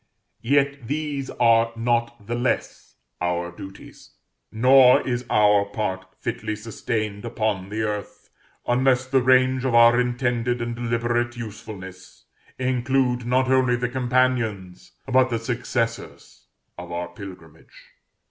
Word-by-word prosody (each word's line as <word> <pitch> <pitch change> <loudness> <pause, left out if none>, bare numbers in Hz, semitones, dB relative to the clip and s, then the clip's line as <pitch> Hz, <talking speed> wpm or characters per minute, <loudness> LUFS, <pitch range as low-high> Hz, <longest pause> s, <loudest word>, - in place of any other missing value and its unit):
Yet 140 0 +1
these 145 -1 -3
are 115 -1 +3
not 120 -1 -1
the 115 - -4
less 120 +1 -3 0.3
our 90 0 -1
duties; 95 +2 -12 0.4
nor 125 +3 +5
is 125 -1 -2
our 105 -2 +4
part 100 -2 -4
fitly 110 0 -3
sustained 110 -1 -4
upon 110 -5 -2
the 110 +1 -2
earth, 105 -1 -5 0.3
unless 130 +1 +2
the 130 0 +2
range 130 0 +3
of 130 -3 0
our 120 +1 +6
intended 120 -1 0
and 120 0 -3
deliberate 120 0 -1
usefulness 100 -5 -10 0.3
include 125 -1 0
not 130 +1 +2
only 130 -2 +3
the 125 0 -2
companions, 120 -8 -1
but 130 -1 +3
the 115 - -1
successors, 115 0 -4 0.3
of 90 0 -9
our 85 +1 -4
pilgrimage. 90 -6 -13
120 Hz, 120 wpm, -23 LUFS, 105-125 Hz, 0.4 s, our